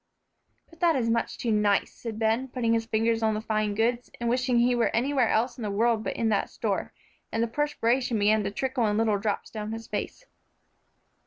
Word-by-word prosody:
"But 330 - -20
that 340 -3 +3
is 230 -3 +1
much 230 0 -1
too 235 - -1
nice," 210 -2 +2
said 225 -3 -7
Ben, 225 +4 +1
putting 245 -3 0
his 225 0 0
finger 225 0 +2
on 220 -1 +2
the - - -1
fine 215 -2 -1
goods, 235 +3 0
and 235 - -2
wishing 250 0 +1
he 240 +1 +4
were 240 -1 +2
anywhere 255 0 +2
else 245 +4 0
in - - -6
the 210 - -2
world 220 +2 +1
but - - -3
in 225 - 0
that 205 -2 0
store, - - -2 0.4
and 225 - 0
the - - 0
perspiration 250 -3 0
began 210 +1 +3
to 200 - -1
trickle 255 +2 -1
in 210 0 0
little 220 -2 +2
drops 205 0 -2
down 215 0 -5
his 225 0 -6
face. - - -5
230 Hz, 215 wpm, -27 LUFS, 215-245 Hz, 0.4 s, he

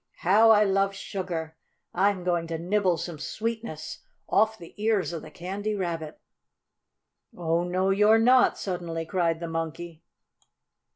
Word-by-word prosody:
"How 210 +6 +5
I 215 -1 +7
love 195 0 +1
sugar! 170 -5 -5 0.4
I'm 190 0 +1
going 175 -2 0
to 165 0 -3
nibble 180 +1 +1
some 170 -1 -6
sweetness 220 -1 -5 0.3
off 220 0 +2
the 170 -4 -13
ears 215 -5 +1
of 165 - -5
the 155 - -11
Candy 200 +6 -4
Rabbit." 165 -5 -4 1.2
"Oh, 170 0 0
no 185 +2 0
you're 210 +3 +5
not!" 250 +3 +4
suddenly 170 -3 -4
cried 170 -2 0
the 170 - -5
Monkey. 165 0 -5
180 Hz, 135 wpm, -26 LUFS, 165-205 Hz, 1.2 s, I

